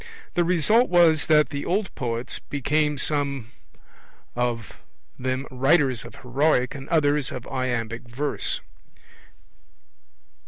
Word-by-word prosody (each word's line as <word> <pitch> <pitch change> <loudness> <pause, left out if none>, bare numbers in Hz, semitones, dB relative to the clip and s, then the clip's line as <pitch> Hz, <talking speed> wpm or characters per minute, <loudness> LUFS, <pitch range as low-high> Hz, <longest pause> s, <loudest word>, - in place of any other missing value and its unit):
The 175 - +2
result 180 - +3
was 170 -3 +4
that 150 -1 +4
the 145 -2 -4
old 195 +2 -1
poets 120 0 -3
became 150 +1 -1
some 140 -4 -1 0.8
of 120 -3 -3 0.4
them 130 +1 -2
writers 135 -1 +2
of - - -11
heroic 130 0 +1
and 135 -1 -9
others 150 -4 +2
of 125 - -6
iambic 120 -2 -3
verse. 140 +5 -2
140 Hz, 110 wpm, -24 LUFS, 125-155 Hz, 0.8 s, was